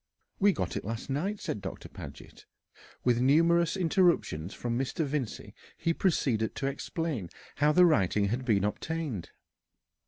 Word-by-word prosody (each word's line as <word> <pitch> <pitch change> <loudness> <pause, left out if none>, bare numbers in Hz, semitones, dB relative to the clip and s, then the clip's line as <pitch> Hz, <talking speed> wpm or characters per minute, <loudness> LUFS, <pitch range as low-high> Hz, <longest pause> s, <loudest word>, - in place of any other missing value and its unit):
"We 205 +1 +5
got - - -3
it - - -3
last 115 +5 -5
night," 195 +9 -1
said 105 - -4
Doctor 95 - -7
Paget. - - -11 0.6
With 120 -1 +3
numerous 165 +6 +4
interruptions 170 - +2
from 120 -1 -3
Mr. 135 +5 -1
Vincey, 140 -5 -4 0.2
he 165 - +1
proceeded 130 - +1
to 135 - -3
explain 140 - -3 0.3
how 150 +1 +4
the 180 +3 +6
writing 100 - +3
had 125 +4 -1
been 105 -6 +2
obtained. 135 - -3
135 Hz, 145 wpm, -29 LUFS, 110-165 Hz, 0.6 s, the